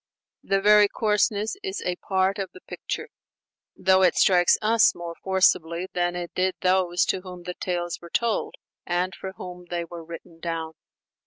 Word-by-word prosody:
The 195 - +1
very 210 +1 +6
coarseness 210 - 0
is 395 -1 -4
a 180 - 0
part 190 0 0
of 195 -2 -3
the 185 - -13
picture; - - -6 0.7
though 190 0 +3
it 185 - +4
strikes 180 -2 +5
us 220 +1 +4
more 170 -1 -6
forcibly 185 -2 +2
than 175 0 0
it 175 -1 -5
did 185 0 0
those 180 -1 +2
to 185 - -1
whom 180 -1 -10
the 180 0 -5
tales 175 -1 -3
were 170 - -11
told 230 +4 -1 0.3
and 180 +2 -1
for 190 +2 -7
whom 180 -1 -9
they 175 -1 -2
were 170 0 -9
written 165 0 -11
down. 165 -1 -4
180 Hz, 170 wpm, -25 LUFS, 175-195 Hz, 0.7 s, very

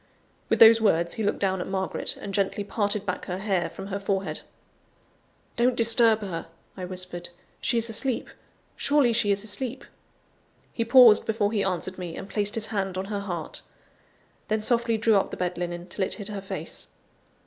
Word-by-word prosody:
With - - +2
those 225 0 +8
words 170 -5 +2
he 225 - -3
looked 205 - 0
down 190 -2 0
at - - -5
Margaret, 190 -1 -2
and 200 - -7
gently 200 0 0
parted 205 0 -1
back 185 -2 -3
her 180 - -4
hair 190 -4 -1
from 195 +3 -9
her 200 0 -3
forehead. 195 -1 -2 1.2
"Don't 240 +1 +3
disturb 230 -1 +4
her," 180 -6 -5 0.3
I 185 - -6
whispered, 180 -1 -5 0.3
"she 235 - +1
is 230 0 +2
asleep; 235 +3 -1 0.4
surely 280 -5 +2
she 220 -2 +2
is 200 0 0
asleep!" 235 +5 -2 0.9
He 230 - -1
paused 230 -2 +7
before 215 -2 +1
he 210 -3 0
answered 185 0 -2
me, 175 -2 -6
and 195 - -7
placed 205 0 -1
his 225 -1 -1
hand 195 -2 -2
on 190 - -2
her 200 - -1
heart. 175 -5 -5 0.9
Then 215 0 0
softly 235 0 +1
drew 220 -1 +3
up 195 - 0
the - - -7
bed 180 0 -2
linen, 175 0 -4
till 190 +2 -3
it - - -2
hid 205 -2 -7
her 205 -2 -5
face. 190 - -6
200 Hz, 185 wpm, -26 LUFS, 185-225 Hz, 1.2 s, those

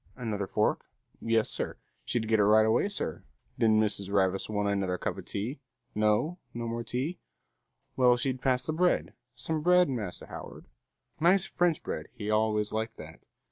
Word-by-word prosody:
Another 105 -6 -3
fork? - - 0 0.3
Yes, 115 -1 +2
sir. - - -3 0.3
She'd 115 -3 -1
get 110 -1 +3
it - - +5
right 110 +1 +6
away, 110 - +2
sir. 190 - -3 0.4
Did 115 - +4
Mrs. 105 -2 +2
Ravis 95 -1 +1
want 105 -1 0
another 95 -2 0
cuppa - - -3
tea? 115 +8 -4 0.3
No? 110 - +1 0.2
No 120 0 -3
more 115 +1 -3
tea? 135 +10 -3 0.8
Well, 125 -1 +5
she'd 130 0 -2
pass 130 -1 +2
the 155 - -1
bread. 180 +3 +1 0.2
Some 150 +5 -2
bread, 180 +1 +5
Master 110 -9 -4
Howard? - - -9 0.5
Nice 180 +4 +4
French 175 -3 0
bread, - - -4
he 105 -4 -4
always 105 -1 +1
liked 110 +1 -3
that. 80 +1 -12
115 Hz, 165 wpm, -29 LUFS, 105-135 Hz, 0.8 s, right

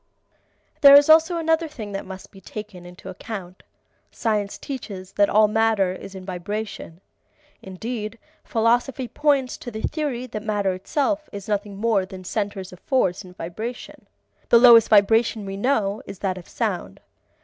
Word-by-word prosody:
There 280 -1 +10
is 285 +1 +7
also 325 +2 +5
another 325 0 +1
thing 220 -9 -8
that 195 -1 -5
must 190 0 -10
be 195 - -15
taken 195 -3 -9
into 180 +1 -13
account. 185 -1 -8 0.5
Science 210 -3 -2
teaches 200 -9 -7
that 205 0 +2
all 215 +1 +5
matter 215 -3 +2
is 195 +1 -10
in 185 -1 -9
vibration. 190 -1 -6 0.6
Indeed, 215 +3 -6 0.3
philosophy 240 +3 0
points 280 -2 0
to 245 - -8
the 220 -1 -7
theory 285 -6 -2
that 220 -4 -6
matter 205 -3 -1
itself 295 - -2
is 200 -1 -8
nothing 205 -1 -2
more 215 -2 +1
than 190 -1 -10
centers 200 -1 -4
of 180 - -13
force 190 -9 0
in 180 -1 -13
vibration. 215 +9 -7 0.4
The 235 - +7
lowest 230 -2 +8
vibration 220 +1 +3
we 195 0 -5
know 210 -2 0
is 195 - -8
that 185 -1 -2
of 175 - -15
sound. - - -3
215 Hz, 160 wpm, -23 LUFS, 190-240 Hz, 0.6 s, There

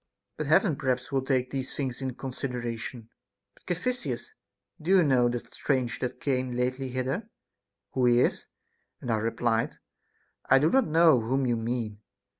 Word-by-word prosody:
But - - -3
Heaven 165 - +4
perhaps 130 +1 -1
will 135 -1 +1
take 130 -1 0
these 130 -1 -4
tilings 135 -2 -3
into 130 -2 -3
consideration. 125 -3 -5 0.4
But, - - -27
Caphisias, 180 - -2 0.5
do 160 - -5
you 190 -2 +6
know 125 -5 +4
that 120 0 -5
stranger 130 -4 -1
that - - -14
came 130 -3 -1
lately 130 +2 -1
hither, 130 - -2 0.6
who 125 -2 +2
he 120 0 +5
is? - - 0 0.5
And 120 - -3
I 110 - +2
re 115 +2 0
plied, 115 0 0 0.7
I 135 - +7
do 150 +4 +3
not 265 -1 +4
know 160 -3 +5
whom 130 +4 0
you 120 -1 +2
mean. 115 -2 -3
130 Hz, 165 wpm, -28 LUFS, 120-140 Hz, 0.7 s, I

